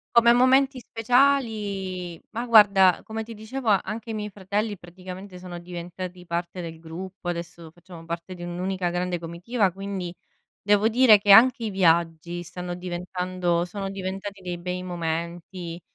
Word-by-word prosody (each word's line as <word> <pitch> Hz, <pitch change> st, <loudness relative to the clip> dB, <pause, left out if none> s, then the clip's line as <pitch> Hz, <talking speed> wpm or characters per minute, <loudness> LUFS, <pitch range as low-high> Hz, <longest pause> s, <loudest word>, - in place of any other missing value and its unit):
Come 235 Hz, 0 st, +7 dB
momenti 260 Hz, +2 st, +4 dB
speciali, 215 Hz, -8 st, 0 dB
ma 235 Hz, +3 st, -3 dB
guarda, 200 Hz, -5 st, +6 dB
come 220 Hz, 0 st, -5 dB
ti 225 Hz, 0 st, -9 dB
dicevo, 225 Hz, +3 st, -4 dB
anche 215 Hz, +3 st, 0 dB
i -, -, -2 dB
miei 210 Hz, -1 st, -4 dB
fratelli 205 Hz, +2 st, -2 dB
praticamente 185 Hz, +1 st, -10 dB
sono 180 Hz, -1 st, -8 dB
diventati 180 Hz, +1 st, -7 dB
parte 170 Hz, +1 st, -3 dB
del 165 Hz, -1 st, -7 dB
gruppo, 175 Hz, +2 st, -7 dB
adesso 170 Hz, -1 st, -6 dB
facciamo 175 Hz, 0 st, -13 dB
parte 170 Hz, +2 st, -5 dB
di 175 Hz, -, -11 dB
un'unica 180 Hz, +1 st, -2 dB
grande 175 Hz, 0 st, -2 dB
comitiva, 180 Hz, +5 st, -1 dB
quindi 195 Hz, -2 st, -5 dB, 0.5 s
devo 205 Hz, +2 st, +3 dB
dire 235 Hz, -2 st, +7 dB
che 200 Hz, 0 st, +3 dB
anche 240 Hz, +3 st, +7 dB
i -, -, -1 dB
viaggi 170 Hz, -1 st, +1 dB
stanno 175 Hz, +1 st, -6 dB
diventando 180 Hz, -1 st, -2 dB
sono 195 Hz, +1 st, -5 dB
diventati 195 Hz, +1 st, -5 dB
dei 175 Hz, -1 st, -4 dB
bei 180 Hz, +1 st, -4 dB
momenti, 170 Hz, 0 st, -4 dB
185 Hz, 145 wpm, -25 LUFS, 175-210 Hz, 0.5 s, Come